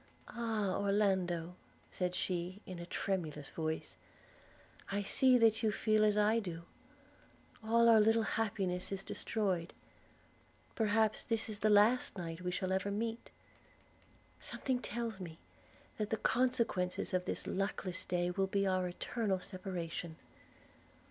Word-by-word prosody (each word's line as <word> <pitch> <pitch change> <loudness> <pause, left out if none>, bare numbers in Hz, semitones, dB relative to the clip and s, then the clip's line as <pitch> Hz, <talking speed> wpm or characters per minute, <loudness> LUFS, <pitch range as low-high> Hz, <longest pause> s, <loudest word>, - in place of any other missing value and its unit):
'Ah! 220 -5 -1
Orlando,' 190 -4 +1 0.4
said 180 -1 -1
she, 180 +1 -2
in 185 -2 -7
a 170 - -7
tremulous 155 -8 -3
voice, 160 -1 -3 0.9
'I 200 +1 0
see 255 +5 +5
that 225 -2 +4
you 220 - +2
feel 215 +1 +2
as 210 -1 +3
I 215 +2 +4
do. 170 -5 -6 1.0
All 230 +1 +4
our 225 -1 +8
little 225 +1 +4
happiness 195 -5 -1
is 195 -1 -3
destroyed; 190 -8 -2 1.0
perhaps 220 -1 +2
this 225 -1 -1
is 215 -2 -4
the 215 - +2
last 210 +3 +4
night 165 -1 -5
we 180 - -2
shall 185 +1 -2
ever 190 +1 0
meet: 225 +3 -3 1.1
something 260 -2 -1
tells 230 -3 -4
me, 165 -3 -7 0.6
that 210 -1 -1
the 220 - 0
consequences 230 -11 +1
of 180 0 +1
this - - -2
luckless 190 -1 -2
day 175 0 0
will 195 +1 0
be 195 +1 +1
our 185 -1 +1
eternal 195 +2 -1
separation.' 180 -3 -5
195 Hz, 135 wpm, -34 LUFS, 180-220 Hz, 1.1 s, our